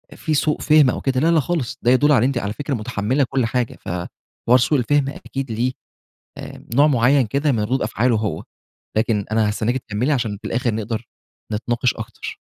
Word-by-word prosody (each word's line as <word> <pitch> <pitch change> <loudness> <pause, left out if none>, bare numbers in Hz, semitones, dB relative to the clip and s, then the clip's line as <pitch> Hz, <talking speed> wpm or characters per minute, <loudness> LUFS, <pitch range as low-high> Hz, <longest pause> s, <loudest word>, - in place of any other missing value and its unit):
في 160 - -2
سوء 150 +1 +1
فهم 150 -3 +5
أو - - -2
كده، 130 -1 0
لا، 160 +5 +3
لا 165 - +4
خالص 155 -5 -2
ده 120 - +3
يدل 145 +4 +4
على 125 -5 +4
أنتِ 135 -1 0
على 105 -3 -2
فكرة 145 +5 -4
متحمّلة 120 +3 0
كل 135 -3 +1
حاجة 120 +1 -2
ف - - -8 0.6
حوار 125 +2 +7
سوء 135 +4 +2
الفهم 140 +2 +1
أكيد 135 -2 -6
ليه 120 +3 0 1.0
نوع 145 +3 +6
معيّن 135 0 +3
كده 140 +6 +1
من 115 - 0
ردود 130 +5 -1
أفعاله 120 +1 +1
هو، 105 -1 -3 0.5
لكن 110 -2 +1
أنا 110 -1 +2
هاستناكِ 115 +4 -1
تكملي 120 +2 -2
عشان 115 -7 -1
في - - -6
الآخر 120 -1 -1
نقدر 110 +1 -4 0.5
نتناقش 120 +3 0
أكتر. 110 0 -7
125 Hz, 190 wpm, -21 LUFS, 110-140 Hz, 1.0 s, حوار